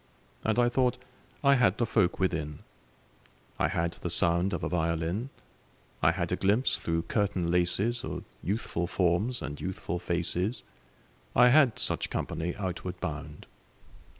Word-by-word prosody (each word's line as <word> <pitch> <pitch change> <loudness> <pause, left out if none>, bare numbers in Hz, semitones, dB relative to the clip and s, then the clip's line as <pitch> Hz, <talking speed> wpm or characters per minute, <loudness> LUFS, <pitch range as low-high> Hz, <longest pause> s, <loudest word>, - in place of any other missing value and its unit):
And 110 0 +1
I 120 0 +4
thought 125 0 +1 0.5
I 140 0 +6
had 120 -8 +3
the 120 - +1
folk 105 -6 +1
within: 80 -6 -2 1.0
I - - +3
had 85 0 -1
the - - -5
sound 85 +3 +2
of - - -3
a - - 0
violin; 85 - -1 0.7
I 80 - +5
had 85 0 -1
a - - +2
glimpse 105 +8 +2
through 85 0 -1
curtain 95 -5 0
laces 90 +7 +2
Of - - -5 0.2
youthful 90 -3 -2
forms 95 +7 +1
and 75 0 -6
youthful 90 -1 -3
faces. 90 +5 -1 0.7
I 125 0 +7
had 135 -3 +5
such - - -1
company 85 +2 -3
outward 90 -1 -4
bound. 75 -2 -6
90 Hz, 145 wpm, -29 LUFS, 85-110 Hz, 1.0 s, I